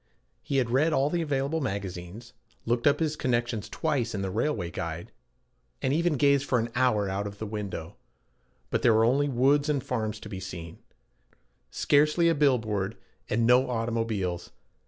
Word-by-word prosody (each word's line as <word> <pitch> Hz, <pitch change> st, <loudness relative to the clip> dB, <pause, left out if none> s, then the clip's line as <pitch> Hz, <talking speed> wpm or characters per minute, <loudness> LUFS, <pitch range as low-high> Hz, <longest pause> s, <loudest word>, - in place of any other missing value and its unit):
He 140 Hz, -, -2 dB
had 125 Hz, -3 st, +1 dB
read 150 Hz, +6 st, +3 dB
all 140 Hz, +1 st, +2 dB
the 175 Hz, -, 0 dB
available 145 Hz, +1 st, -1 dB
magazines, 100 Hz, 0 st, -5 dB, 0.3 s
looked 120 Hz, +2 st, +1 dB
up 145 Hz, -, +4 dB
his 155 Hz, -2 st, 0 dB
connections 120 Hz, -5 st, -1 dB
twice 135 Hz, -8 st, -1 dB
in 100 Hz, -, -2 dB
the 95 Hz, -, -2 dB
railway 90 Hz, -, -1 dB
guide, 85 Hz, 0 st, -5 dB, 0.7 s
and 130 Hz, -, 0 dB
even 170 Hz, +2 st, +2 dB
gazed 140 Hz, 0 st, +4 dB
for 130 Hz, -, +1 dB
an 115 Hz, 0 st, -1 dB
hour 120 Hz, -5 st, +2 dB
out 100 Hz, +2 st, -2 dB
of 100 Hz, 0 st, -8 dB
the 110 Hz, -, -5 dB
window. 100 Hz, -6 st, -5 dB, 0.7 s
But -, -, +1 dB
there 115 Hz, -, +5 dB
were 110 Hz, +1 st, +4 dB
only 140 Hz, +4 st, +2 dB
woods 140 Hz, +4 st, +3 dB
and 140 Hz, -4 st, 0 dB
farms 110 Hz, -3 st, -2 dB
to -, -, -8 dB
be 100 Hz, -3 st, -6 dB
seen, 85 Hz, -3 st, -8 dB, 0.9 s
scarcely 150 Hz, +4 st, +3 dB
a -, -, +4 dB
bill 140 Hz, -4 st, +4 dB
board, 105 Hz, -1 st, -3 dB, 0.3 s
and 115 Hz, +2 st, +1 dB
no 125 Hz, +2 st, +4 dB
automobiles. 115 Hz, -6 st, -2 dB
120 Hz, 175 wpm, -27 LUFS, 100-140 Hz, 0.9 s, there